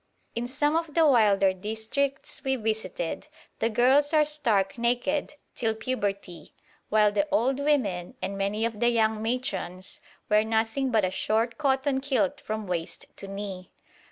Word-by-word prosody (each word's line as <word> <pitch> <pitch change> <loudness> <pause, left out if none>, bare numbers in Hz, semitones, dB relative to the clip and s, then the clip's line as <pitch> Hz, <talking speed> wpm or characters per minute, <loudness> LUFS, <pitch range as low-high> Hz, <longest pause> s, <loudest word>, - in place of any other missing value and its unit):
In 235 +1 -2
some 295 +4 0
of 330 -2 -2
the 330 -1 +5
wilder 205 -8 +4
districts 220 +8 -3
we 265 0 +1
visited 220 - -3 0.3
the 225 - +1
girls 265 +7 +3
are 305 -1 +5
stark 235 -9 0
naked 250 +6 0 0.2
till 225 -2 -1
puberty, 200 -8 -4 0.3
while 210 -1 +4
the 210 +9 +1
old 270 -1 +2
women 255 -10 0
and 200 - -3
many 200 +3 -1
of 225 -2 -3
the 240 +1 +4
young 220 -2 +1
matrons 220 -6 -3 0.3
wear 210 0 +4
nothing 225 +4 0
but 220 -5 +3
a 185 - -1
short 220 +6 0
cotton 270 -1 +1
kilt 280 +1 0
from 215 0 -4
waist 175 -3 -4
to 195 - -7
knee. 195 -2 -6
225 Hz, 155 wpm, -27 LUFS, 205-270 Hz, 0.3 s, the